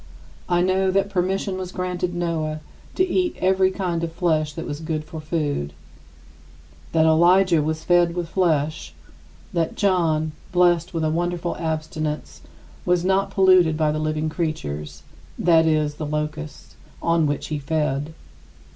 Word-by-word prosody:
I 175 0 +3
know 190 +1 +2
that 195 +1 +1
permission 190 +1 -1
was 185 -1 -5
granted 180 -1 -3
Noah 160 -3 -2 0.3
to 370 - +2
eat 360 -1 0
every 190 0 +3
kind 180 -3 -2
of 165 - -2
flesh 160 -3 0
that 165 +2 -6
was 145 - -5
good 160 -1 -3
for 160 0 -8
food; 150 - -2 1.2
that 160 -1 +3
Elijah 170 +1 +5
was 160 +1 -2
fed 175 -1 +3
with 175 -2 -2
flesh; 160 -4 0 0.6
that 165 -2 -1
John, 165 -6 +1 0.2
blessed 175 -1 +2
with 165 - 0
a 155 - +1
wonderful 175 +1 -1
abstinence, 155 - -4 0.4
was 180 0 +1
not 195 +1 +2
polluted 185 -5 +4
by 155 -1 +2
the 155 - -2
living 155 0 -1
creatures 75 - -4 0.3
(that 165 -2 +4
is, 155 -2 +1
the 150 0 -5
locusts) 150 +1 -5 0.3
on 165 -2 +2
which 145 0 -3
he 150 -1 -2
fed. 150 0 -2
165 Hz, 145 wpm, -23 LUFS, 155-180 Hz, 1.2 s, Elijah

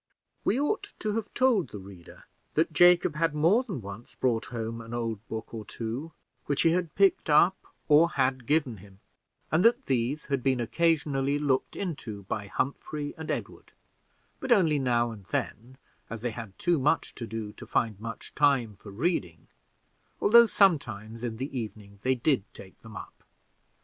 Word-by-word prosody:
We 245 - +1
ought 295 +9 -1
to 215 -1 -2
have 225 -1 -3
told 245 -8 +3
the - - -8
reader 95 -3 -13 0.3
that 160 +1 +1
Jacob 175 0 +5
had 165 -1 +1
more 170 +10 +4
than 190 - -5
once 100 +4 -10
brought 115 -3 0
home 115 +1 -5
an 115 +1 -7
old 115 -3 -2
book 110 +1 -6
or 110 -2 -5
two 115 +9 -5 0.4
which 145 - +1
he 165 - +5
had 170 -2 -1
picked 195 -4 +3
up, 170 +5 +5 0.3
or 155 +3 +6
had 130 -4 0
given 145 -6 +1
him, 95 0 -16 0.5
and 160 +3 +3
that 240 +3 +4
these 130 +4 -1
had 140 -2 -1
been 130 -1 +1
occasionally 145 0 +1
looked 140 -3 0
into 125 - -5
by 100 +1 -4
Humphrey 145 +6 -3
and 160 -1 -8
Edward, - - -5 0.7
but 265 - -4
only 165 -10 +4
now 120 -3 +1
and 105 -4 -11
then, 115 +4 -4 0.3
as 115 -2 -6
they 120 - -1
had 110 -4 -9
too 175 -3 +1
much 150 +4 +1
to 115 - -7
do 110 -1 -5
to - - -12
find 110 -4 0
much 115 0 -7
time 130 -8 +2
for 105 - -12
reading, 100 - -2 0.7
although 235 +2 +7
sometimes, 115 - +1
in 115 -2 -4
the 135 +3 -5
evening, 105 -4 -6
they 130 +2 +2
did 125 -2 +1
take 95 -1 -13
them 110 -3 -10
up. - - -11
130 Hz, 175 wpm, -28 LUFS, 110-165 Hz, 0.7 s, although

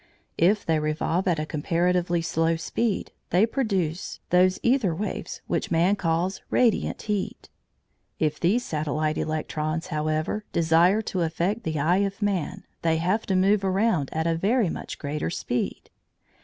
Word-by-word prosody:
If 200 +5 +3
they 160 -1 +2
revolve 155 +4 -1
at 175 -3 +2
a 155 - -2
comparatively 170 +2 0
slow 165 0 +1
speed 205 +6 -2 0.2
they 185 +5 +4
produce 195 - -2
those 185 +1 +4
æther 235 -10 +2
waves 210 - -4
which - - -1
man 175 +4 +3
calls 180 0 -1
radiant 240 -4 +1
heat. 210 -3 -3 0.7
If 155 -1 0
these 215 +8 +2
satellite 155 0 -1
electrons, 155 +1 -2
however, 155 +7 -1
desire 170 +6 +3
to 185 -3 -2
affect 170 +7 0
the 155 -2 -1
eye 170 +5 +3
of 200 0 -1
man, 195 -2 -1 0.2
they 165 -1 +2
have 185 +7 0
to 190 - +1
move 195 +2 +3
around 190 -6 +1
at 160 +1 -1
a 165 - +2
very 200 +5 +2
much - - -6
greater 150 +1 -3
speed. 125 -7 -3
175 Hz, 150 wpm, -25 LUFS, 160-195 Hz, 0.7 s, they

